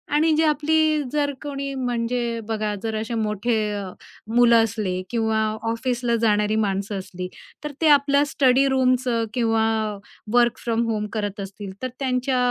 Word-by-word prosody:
आणि 315 +2 +3
जे 320 - +3
आपली 310 0 +2
जर 290 -1 0
कोणी 275 -1 -4
म्हणजे 240 -2 -1
बघा 215 -1 -1
जर 220 -1 -2
असे 225 +2 -5
मोठे 215 +1 -1 0.2
अ, 205 -1 -3 0.5
मुलं 235 -1 +6
असले 205 -5 -2
किंवा 220 -2 0 0.3
ऑफिसला 240 0 -1
जाणारी 210 -1 +2
माणसं 200 -1 -1
असली, 185 -1 -7 0.4
तर 300 - -4
ते 320 - +4
आपल्या 280 0 +5
स्टडी 270 -2 +3
रूमचं 255 -3 +2
किंवा 225 -2 +2 0.7
वर्क 240 -1 +4
फ्रॉम 230 -1 0
होम 210 -1 -1
करत 205 -1 -3
असतील, 195 0 -7
तर 255 - -1
त्यांच्या 255 -1 0
235 Hz, 150 wpm, -23 LUFS, 215-265 Hz, 0.7 s, मुलं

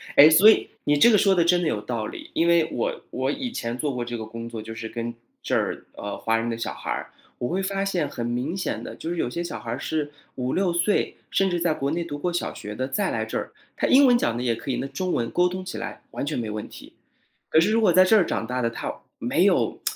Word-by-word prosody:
诶， 145 +2 +10
所 185 +7 +8
以， - - +3
你 145 0 +2
这 235 - +7
个 210 - +6
说 195 0 +4
的 170 - +4
真 175 +1 +3
的 170 - 0
有 105 -9 -1
道 110 -1 -3
理。 - - -8
因 170 - +2
为 170 -2 +4
我 - - -2
我 - - -1
以 265 -3 -4
前 115 - -3
做 140 +1 -1
过 125 - -2
这 120 0 -4
个 110 - -5
工 115 +1 -7
作， 110 -2 -6
就 110 +1 -8
是 115 0 -5
跟 115 +1 -4 0.3
这 - - -1
儿， - - -1
呃， 100 - -6
华 115 0 +1
人 115 +1 -2
的 115 - -2
小 115 - -3
孩 - - -8
儿。 - - -4 0.3
我 120 - -2
会 190 +3 0
发 195 +1 -1
现 175 -7 0
很 120 - -4
明 125 +10 -2
显 - - -3
的， - - -7
就 165 - -5
是 175 - -3
有 120 - 0
些 170 +7 -3
小 170 - -5
孩 115 - -8
儿 120 - -2
是 150 -2 -2 0.2
5-6 170 +8 0
岁， 175 +4 +1
甚 195 -1 +2
至 175 - 0
在 170 -1 +2
国 140 -2 -1
内 170 +2 -1
读 145 -3 -5
过 175 +4 -2
小 175 - -1
学 105 +1 -7
的， 130 +4 -3
再 195 +7 0
来 - - -1
这 - - -3
儿， - - -5 0.2
他 - - 0
英 270 +1 +6
文 245 - +6
讲 120 - 0
得 120 - -3
也 120 -2 +1
可 130 +4 -5
以， - - -1
那 135 - -3
中 185 +4 -2
文 115 -1 0
沟 180 0 +3
通 185 +1 -4
起 185 - -6
来 - - -6
完 - - -3
全 145 -1 -2
没 110 -2 -3
问 105 0 -5
题。 - - -12 0.6
可 160 - +3
是 180 +6 +4
如 225 - +3
果 210 - +5
在 185 +2 +6
这 185 - +4
儿 180 - +3
长 115 - -2
大 125 +1 -2
的， 115 - +1
他 115 - -4 0.3
没 - - +1
有 - - +2
155 Hz, 305 characters per minute, -24 LUFS, 120-185 Hz, 0.6 s, 诶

